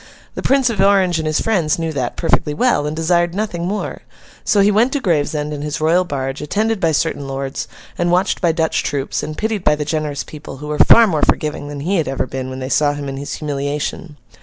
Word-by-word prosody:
The - - -5
Prince 265 -2 +3
of 205 -4 0
Orange 190 -4 +3
and 160 - -2
his 155 - +1
friends 175 -9 +1
knew 165 -1 -2
that, 125 -4 -3
perfectly 150 -3 +1
well, 240 -7 +2
and 150 - -3
desired 170 +2 +1
nothing 185 -5 -2
more. 205 +2 -3 0.4
So, 205 - +2
he 200 +1 +4
went 225 +5 +3
to 285 - +1
Gravesend, 150 - 0
in 145 - -5
his 150 +1 -3
royal 165 +4 +3
barge, 135 -3 -3
attended 215 +8 0
by 165 -3 +2
certain 150 -2 -1
lords, 135 0 -4 0.3
and 175 0 +1
watched 180 +2 +1
by 170 -3 +3
Dutch 160 -1 0
troops, 140 -1 -2
and 155 - -6
pitied 215 -3 -2
by 150 - +4
the 150 0 -3
generous 150 -2 -2
people, 145 -3 -10
who 150 +2 -8
were 150 - -3
far 230 - +8
more 160 -8 0
forgiving 150 -1 0
than 145 -1 -6
he 185 +6 0
had 160 - 0
ever 135 -1 -1
been, 130 0 -5
when 130 - -6
they 130 0 -4
saw 145 +1 +2
him 145 -1 -5
in 135 - -5
his 140 +1 -5
humiliation. 145 +2 -4
155 Hz, 235 wpm, -18 LUFS, 145-185 Hz, 0.4 s, far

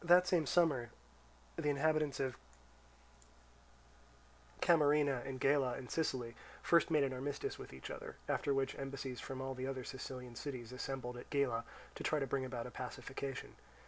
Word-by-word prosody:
The 175 +1 +8
same 175 -4 +2
summer, 145 -10 +3 0.7
the 150 - +1
inhabitants 150 0 +2
of 130 -2 0 2.2
Camarina 145 -5 +5
and 130 -1 -4
Gela 135 -2 +3
in 130 -2 -7
Sicily 130 -7 0 0.3
first 170 0 +5
made 155 -3 +4
an 135 -1 0
armistice 135 +2 -3
with - - -8
each 65 0 -7
other, - - -6
after 140 - +1
which 135 0 +2
embassies 135 -2 -4
from 130 -1 -5
all 135 0 -2
the 130 0 -3
other 130 -1 -3
Sicilian 130 -1 -6
cities 125 -4 -5
assembled 125 -1 -4
at 120 - -9
Gela 125 -5 +1 0.3
to - - -6
try 155 - +2
to 140 - +1
bring 135 0 0
about 120 -2 -3
a 125 - -6
pacification. 135 +2 -5
135 Hz, 160 wpm, -37 LUFS, 125-145 Hz, 2.2 s, The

